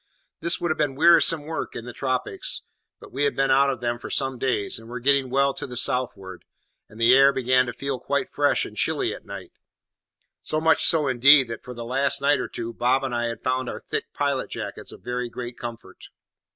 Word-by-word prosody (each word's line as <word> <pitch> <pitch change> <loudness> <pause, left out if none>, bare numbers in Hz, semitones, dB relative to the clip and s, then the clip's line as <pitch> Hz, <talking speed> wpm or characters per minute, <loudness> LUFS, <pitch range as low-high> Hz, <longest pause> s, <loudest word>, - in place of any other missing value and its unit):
This 170 0 0
would 175 - -1
have 155 - -3
been 145 -3 0
wearisome 165 0 +5
work 160 +2 -5
in 115 - -6
the 120 - -8
tropics; 130 -2 -2 0.4
but - - -14
we 140 +3 0
had 140 - 0
been 135 0 +1
out 140 +1 +4
of 130 -3 -3
them 120 0 -2
for - - -8
some 135 -2 -1
days, 115 -5 -1
and 115 0 -14
were 125 +1 -6
getting 135 +1 +2
well 140 +1 +2
to - - -7
the 125 -1 -7
southward, 100 -7 -1 0.5
and 110 +3 -15
the 115 +2 +5
air 135 +1 +6
began 130 -1 +2
to - - -3
feel 135 +1 -4
quite - - -2
fresh - - +2
and - - -10
chilly - - -1
at - - -11
night; - - -9 0.9
so 155 - -2
much 160 0 +3
so, 155 -4 +4
indeed, 135 +1 +6
that 115 - -7
for 125 0 -9
the 120 0 -7
last 140 +3 0
night 140 +1 +2
or - - -3
two 115 0 -6
Bob 130 +3 +1
and 130 -2 -3
I 120 0 -1
had 115 0 -5
found 130 -1 -1
our - - -7
thick - - -1
pilot 140 -2 -2
jackets - - -7
a - - -11
very 125 0 -4
great 120 0 -7
comfort. 115 -5 -9
130 Hz, 225 wpm, -24 LUFS, 120-140 Hz, 0.9 s, air